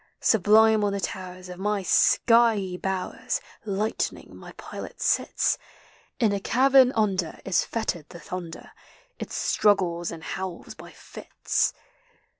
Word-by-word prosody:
Sublime 220 +1 +4
on 200 -1 0
the 200 - -2
towers 185 -1 -6
of 180 0 -9
my 205 0 -1
skvey 225 -3 +3
bowers 185 0 -3 0.3
Lightning, 210 +2 -3
my - - -11
pilot, - - -9
sits: - - +1 0.6
In 220 -5 +2
a 200 - -1
cavern 260 +4 +4
under 190 -6 0
is 190 -2 +2
fettered 185 -9 -4
the 170 - -11
thunder; 175 -2 -8 0.5
It - - -6
struggles 175 -5 +1
and 165 -1 -8
howls 190 -1 -6
by - - -12 0.5
his. - - +2
195 Hz, 125 wpm, -25 LUFS, 180-220 Hz, 0.6 s, Sublime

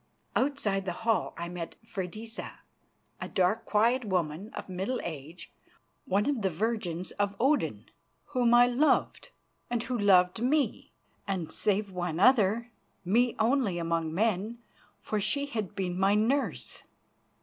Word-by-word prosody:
Outside 215 -9 0
the 180 - -2
hall 225 -1 +1
I 170 - -4
met 170 -2 -6
Freydisa, 220 +2 -6 0.6
a - - -4
dark, 190 +4 +1
quiet 235 +5 +2
woman 180 -1 -2
of - - -6
middle 190 +7 -2
age, 160 +1 -7 0.5
one 200 +2 +1
of 280 -6 0
the 195 - +1
virgins 185 -2 -2
of 200 0 0
Odin, 280 +4 +1 0.5
whom 245 -3 +3
I 240 0 +8
loved 245 +5 +1 0.4
and 240 -1 -1
who 250 +1 -3
loved 195 -2 +4
me 285 +4 0 0.4
and, 180 -5 -2
save 205 -1 0
one 175 -3 -3
other, 230 +1 +4 0.3
me 235 +6 +2
only 225 -5 +2
among 165 -1 -1
men, 215 +4 0 0.4
for 215 - -2
she 280 +8 0
had 215 -8 -4
been 185 -2 -2
my 195 +2 +4
nurse. 250 +7 0
205 Hz, 140 wpm, -29 LUFS, 180-235 Hz, 0.6 s, I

